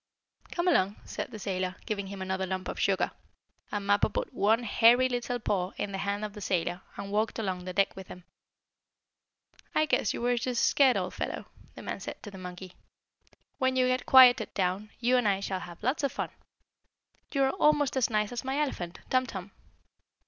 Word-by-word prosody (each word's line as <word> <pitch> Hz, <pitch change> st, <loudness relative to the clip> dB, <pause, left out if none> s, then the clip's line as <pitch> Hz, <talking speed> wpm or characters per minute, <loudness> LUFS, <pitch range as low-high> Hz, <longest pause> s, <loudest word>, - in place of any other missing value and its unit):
"Come 345 Hz, +1 st, -1 dB
along," 200 Hz, -, +3 dB
said -, -, -5 dB
the -, -, -8 dB
sailor, 185 Hz, -2 st, -2 dB
giving 200 Hz, -3 st, -3 dB
him 195 Hz, -1 st, -6 dB
another 190 Hz, 0 st, -2 dB
lump 185 Hz, 0 st, -3 dB
of -, -, -5 dB
sugar, -, -, +1 dB, 0.6 s
and 205 Hz, -1 st, -3 dB
Mappo 205 Hz, 0 st, +3 dB
put -, -, -3 dB
one 220 Hz, +4 st, +2 dB
hairy 235 Hz, +3 st, +5 dB
little 245 Hz, 0 st, -2 dB
paw 195 Hz, -5 st, -1 dB
in 205 Hz, -, -3 dB
the 195 Hz, -, -4 dB
hand 200 Hz, +1 st, -1 dB
of 210 Hz, -, -7 dB
the 210 Hz, -, -9 dB
sailor, 175 Hz, -1 st, -1 dB, 0.2 s
and 200 Hz, 0 st, -6 dB
walked 215 Hz, +2 st, 0 dB
along 185 Hz, -5 st, -3 dB
the 185 Hz, -, -5 dB
deck 195 Hz, +1 st, +2 dB
with 190 Hz, -1 st, -9 dB
him. 180 Hz, -, -11 dB, 1.5 s
"I 310 Hz, -, +4 dB
guess 300 Hz, -, +1 dB
you -, -, -4 dB
were 245 Hz, 0 st, +2 dB
just 240 Hz, 0 st, +1 dB
scared, 270 Hz, -3 st, +4 dB
old -, -, -2 dB
fellow," -, -, -4 dB, 0.3 s
the -, -, -9 dB
man -, -, -4 dB
said -, -, -8 dB
to 205 Hz, -, -8 dB
the 190 Hz, -, -10 dB
monkey. 180 Hz, 0 st, -8 dB, 0.9 s
"When 260 Hz, 0 st, +2 dB
you 255 Hz, 0 st, +3 dB
get 255 Hz, 0 st, 0 dB
quieted 255 Hz, -2 st, +7 dB
down, 190 Hz, +3 st, -1 dB
you 245 Hz, +2 st, +3 dB
and 245 Hz, -4 st, +2 dB
I 195 Hz, -1 st, +2 dB
shall 195 Hz, -1 st, -3 dB
have 175 Hz, +2 st, -10 dB
lots 255 Hz, +7 st, +1 dB
of 280 Hz, -, +1 dB
fun. -, -, -3 dB, 1.0 s
You 275 Hz, -1 st, +2 dB
are 265 Hz, -, +3 dB
almost 300 Hz, -6 st, +2 dB
as 260 Hz, -3 st, +2 dB
nice 215 Hz, -1 st, 0 dB
as 245 Hz, -, -4 dB
my 265 Hz, +1 st, -2 dB
elephant, 185 Hz, -, -3 dB
Tum 255 Hz, 0 st, +3 dB
Tum." 195 Hz, -3 st, -7 dB
210 Hz, 200 wpm, -29 LUFS, 190-255 Hz, 1.5 s, quieted